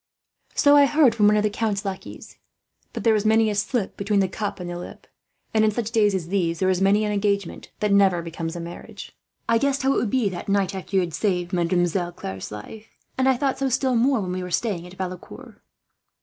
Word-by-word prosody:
"So 290 0 +5
I 285 -1 +7
heard, 290 -5 +4
from 210 -2 +3
one 210 0 +4
of 210 - +2
the 210 - +2
count's 210 -2 -2
lackeys; 195 -1 -7 0.5
but - - -6
there 225 - +4
is 210 -1 +1
many 220 0 +3
a - - -1
slip 210 +1 -2
between 200 0 +1
the 190 - +2
cup 205 +2 -4
and 180 - -6
the 175 - -5
lip, 175 - -9 0.5
and 220 -1 +3
in 215 - +4
such 220 +1 -3
days 210 -4 +3
as 170 -3 -4
these 175 -4 0
there 185 +2 +2
is 185 0 -1
many 205 +2 +3
an 210 - -1
engagement 200 -2 -2
that 210 -1 +1
never 190 -4 +4
becomes 165 0 -5
a - - -5
marriage. 170 +1 -9 0.3
I 230 - +3
guessed 275 +1 0
how 270 +1 +3
it - - 0
would 235 - 0
be, 245 -1 +1
that 185 +1 -7
night 195 -1 +1
after 190 +1 -6
you 190 - +5
had 170 -2 -4
saved 180 -2 -1
Mademoiselle 175 0 0
Claire's 95 - -7
life; 210 - -9 0.3
and 260 0 +2
I 260 - +3
thought 270 0 -1
so, 270 -1 0
still 260 +1 +1
more, 245 0 +2
when 185 -2 -4
we 185 0 -3
were 180 - -5
staying 180 -2 -2
at 180 - -13
Valecourt." 185 -1 -8
200 Hz, 235 wpm, -23 LUFS, 180-225 Hz, 0.5 s, I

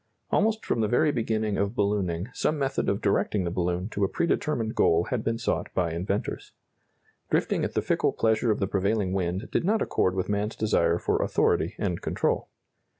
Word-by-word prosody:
Almost 220 +1 +1
from 115 - 0
the 110 - +2
very 150 +7 +3
beginning 110 -4 -1
of 100 +3 -1
ballooning, 100 -3 0
some 155 - 0
method 135 -1 0
of 100 - -1
directing 100 0 +1
the 85 - -2
balloon 90 +1 -1
to 100 - -2
a - - +4
pre - - 0
determined 125 -9 0
goal 85 +1 +3
had 120 -4 -1
been 115 0 0
sought 115 - -2
by 85 -3 0
inventors. 95 +5 -3 0.8
Drifting - - +1
at - - -3
the - - +1
fickle - - +1
pleasure 110 +1 +1
of 105 - +2
the 95 - +1
prevailing 100 0 0
wind 95 +5 -2
did - - +1
not 215 +5 +2
accord 95 - +1
with 95 - -1
man's 105 +1 -1
desire 85 -6 +2
for - - 0
authority - - +1
and 90 -4 -2
control. - - -1
105 Hz, 195 wpm, -27 LUFS, 95-115 Hz, 0.8 s, a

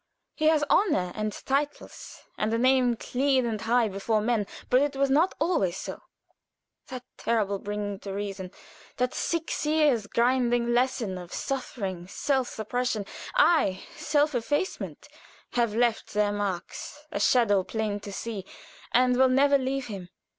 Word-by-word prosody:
He 310 - +1
has 310 -2 +4
honor 290 - +2
and 215 0 -2
titles, 280 +7 -3
and 215 +1 -1
a 230 - +1
name 255 0 +3
clean 260 +2 +1
and 220 -2 -2
high 235 0 +3
before 205 +2 0
men, 215 -2 0 0.2
but 250 +1 +5
it 290 -1 0
was 275 0 +1
not 320 +7 +3
always 295 - +1
so. - - -6 0.9
That 255 -1 -7
terrible 205 -4 0
bringing 205 -1 -4
to 200 - -7
reason 195 -2 -4 0.5
that 250 0 0
six 335 -1 -2
years' 300 -8 +2
grinding 240 0 +2
lesson 240 -6 0
of 175 -1 -10
suffering, 195 -9 -4
self 265 +5 0
suppression 225 -1 -2 0.3
ay, 315 - +3
self 300 -1 +1
effacement 290 +9 -2 0.4
have 235 -3 +1
left 235 -3 0
their 210 -1 +2
marks, 205 +8 -4
a - - -2
"shadow 215 -6 +4
plain 215 0 -2
to 205 0 -8
see," 210 -1 -5 0.5
and 250 +1 +4
will 260 0 +5
never 280 +2 +4
leave 265 0 -2
him. 190 -5 -7
240 Hz, 145 wpm, -27 LUFS, 205-270 Hz, 0.9 s, but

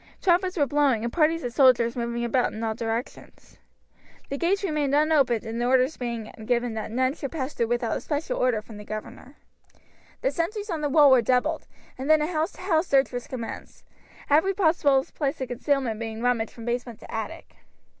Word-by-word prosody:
Trumpets 365 0 +2
were 290 - +3
blowing, 280 -5 +2
and 235 - -3
parties 325 0 +2
of 245 - -4
soldiers 250 -3 +4
moving 235 0 -2
about 245 +1 +1
in 220 - -6
all 220 -1 0
directions. 230 +1 -6 0.7
The 280 - -2
gates 390 +4 +1
remained 300 -6 0
unopened, 250 -7 +2
orders 255 +4 +2
being 235 -3 -5
given 240 0 0
that 220 0 -4
none 255 +3 +1
should 280 -3 -6
pass 280 -3 -4
through 235 - 0
without 240 -1 -1
a - - -7
special 320 +11 -3
order 240 -4 +1
from 220 -1 -12
the 210 - -9
governor. 215 +6 -8 0.9
The - - +1
sentries 410 +4 -3
on 320 -2 -2
the 295 - 0
wall 290 -1 +6
were 260 -2 +6
doubled, 255 +7 0 0.3
and 270 +3 -4
then 310 0 +6
a - - +1
house 320 -1 -1
to - - -13
house 345 -2 +1
search 270 -1 +3
was 245 -1 -5
commenced, 235 -3 -7 0.4
every 320 +7 +3
possible 305 -7 +3
place 280 -3 -2
of 260 - -4
concealment 250 -3 -1
being 225 0 -5
rummaged 240 -3 +1
from 230 - -11
basement 240 -1 -3
to - - -11
attic. 305 +9 -6
260 Hz, 195 wpm, -25 LUFS, 235-310 Hz, 0.9 s, wall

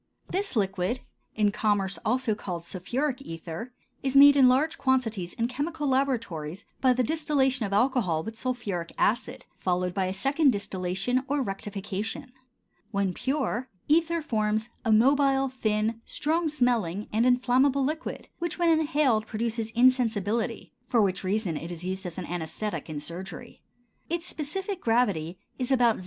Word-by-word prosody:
This 395 -3 -1
liquid, 195 +3 0 0.3
in 210 -1 +3
commerce 200 -4 0
also 245 0 +1
called 180 -5 -5
sulphuric 255 +10 -2
ether, 165 +2 -7 0.3
is 270 0 -1
made 285 +1 +9
in 265 -3 +7
large 290 +6 +2
quantities 225 -9 0
in 230 - 0
chemical 295 +4 -3
laboratories 230 - -1 0.2
by 260 - +5
the 250 +1 +1
distillation 270 -5 +1
of - - -8
alcohol 205 -7 +2
with 225 +4 -6
sulphuric 220 -9 -3
acid, 250 +3 0
followed 180 0 0
by 190 -1 0
a 185 - -2
second 275 +6 +3
distillation 195 +5 -1
or 285 -1 +1
rectification. 205 +4 -5 0.6
When 200 -3 0
pure, 260 -1 -1 0.2
ether 335 +1 +2
forms 215 -4 0
a 225 - +1
mobile, 270 +4 +4
thin, 220 -2 -1
strong 320 +2 0
smelling, 235 - 0
and 220 +2 +3
inflammable 255 +2 +3
liquid 310 +4 -3
which 345 -1 -3
when 345 -1 +3
inhaled 295 -8 +2
produces 225 0 -2
insensibility, 230 -2 +1
for 240 - +2
which 195 -2 +1
reason 190 -3 0
it 165 +3 -6
is 170 0 -6
used 190 +1 -3
as 175 - -7
an 185 - -4
anæsthetic 175 +4 -4
in 155 -2 -4
surgery. 185 +9 -8 0.5
Its 340 +1 -2
specific 370 +5 -4
gravity 200 -8 +1 0.2
is 255 +1 -1
about 240 -4 +4
0. - - -9
235 Hz, 150 wpm, -27 LUFS, 195-270 Hz, 0.6 s, made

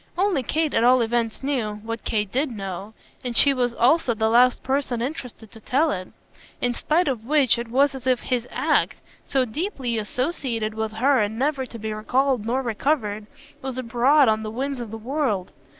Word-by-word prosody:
Only 370 -6 +2
Kate 310 +5 -1
at - - +2
all 250 +1 +5
events 230 +1 -1
knew 245 -7 -1
what 230 0 -5
Kate 210 -3 -1
did 275 +3 0
know, 200 -1 -6 0.3
and 245 -2 -2
she 280 - +6
was 245 -2 0
also 255 -1 +3
the 220 0 +1
last 245 +2 +4
person 265 -2 -1
interested 245 -4 -6
to 225 - -13
tell 295 +8 +2
it; 185 -1 -4 0.5
in 245 0 0
spite 315 +8 +1
of 250 -5 -1
which 265 -4 +3
it 235 - -4
was 275 +4 +3
as 260 -1 -7
if 255 -2 +3
his 245 -2 -2
ACT, 305 +5 +1 0.3
so 265 -2 +2
deeply 260 - -3
associated 235 -2 -2
with 220 0 -3
her 260 +4 +3
and 210 +1 -2
never 270 0 0
to 230 - -9
be 220 -1 -4
recalled 250 +1 0
nor 260 +3 0
recovered, 215 -3 -1 0.3
was 260 -1 -5
abroad 255 +4 +3
on 220 0 +2
the 215 - -4
winds 265 +4 -3
of 235 -2 -6
the 225 - -6
world. 230 -5 -2
245 Hz, 195 wpm, -24 LUFS, 220-275 Hz, 0.5 s, she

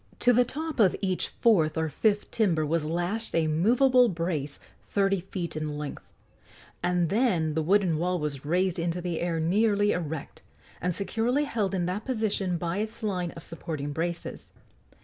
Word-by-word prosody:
To 245 - +5
the 245 +2 +5
top 310 +4 -5
of 195 -5 +5
each 185 -2 -1
fourth 165 -10 +2
or 160 0 +1
fifth 205 +7 0
timber 170 -9 +2
was 160 +1 0
lashed 175 +8 -2
a 165 -1 +3
movable 245 - +4
brace 165 -5 -2 0.3
thirty 195 -1 +2
feet 175 -3 -5
in 155 -1 -3
length, 150 -1 -6 0.7
and 175 -2 +1
then 190 -9 +2
the 160 - 0
wooden 180 -1 +2
wall 180 +1 0
was 150 -4 -4
raised 180 +3 +1
into 170 +1 -1
the 175 -2 -3
air 170 -1 -1
nearly 205 +4 +2
erect, 160 -4 -4 0.4
and 180 - +1
securely 230 - 0
held 210 -9 -1
in 175 -2 0
that 185 +4 -2
position 215 -7 -1
by 170 +3 -2
its 220 +2 -4
line 180 -4 -1
of 165 - -10
supporting 155 -3 -5
braces. 170 +2 -4
180 Hz, 170 wpm, -27 LUFS, 165-210 Hz, 0.7 s, To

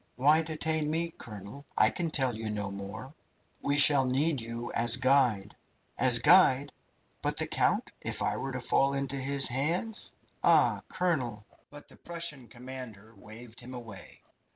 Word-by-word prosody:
"Why 150 +5 +4
detain 160 -1 -2
me, 165 +2 -2
colonel? 105 +4 -10
I - - +5
can 175 -2 -3
tell 130 -6 0
you 110 0 -5
no 105 -2 -4
more." 100 +7 -8 0.5
"We 145 0 0
shall 140 -2 +7
need 140 +2 0
you 115 +1 -6
as 115 0 +4
guide." 130 -6 +1 0.4
"As 125 -2 +6
guide? 145 -1 +4 0.5
But - - -2
the - - +1
count? - - 0
If - - -2
I - - -1
were 135 - -5
to 125 - -4
fall 135 +2 +1
into 140 0 -3
his 135 0 +2
hands? 165 - -2 0.3
Ah, - - +3
colonel 125 -12 -2
" - - -38
The 145 0 -15
Prussian 165 -7 -6
commander 120 -3 -10
waved 110 +4 -12
him 125 +1 -9
away. 110 -6 -10
130 Hz, 155 wpm, -29 LUFS, 115-145 Hz, 0.5 s, shall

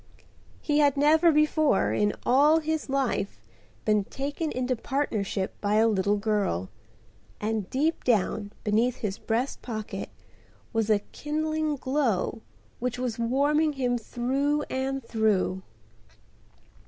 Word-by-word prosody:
He 295 -1 +1
had 285 -2 +4
never 315 +4 +5
before 305 0 +3
in 210 0 +1
all 290 +5 +5
his 315 -2 -2
life 265 -7 -1 0.5
been 210 -1 +3
taken 290 +6 -3
into 255 0 -1
partnership 220 -8 -2
by 205 0 +1
a 220 +1 +5
little 205 -1 +2
girl, 200 - -1 0.7
and 215 -2 -2
deep 310 +5 0
down 210 -2 +1
beneath 225 +4 +2
his 205 -3 -4
breast 235 +4 -2
pocket 215 -3 -5 0.6
was 225 -1 0
a 210 -1 +3
kindling 310 0 -1
glow 260 -7 -1 0.4
which 250 0 -2
was 245 -2 -3
warming 290 +6 +2
him 250 -3 0
through 275 +6 -1
and 265 0 -2
through. 215 -5 +1
250 Hz, 120 wpm, -27 LUFS, 215-290 Hz, 0.7 s, never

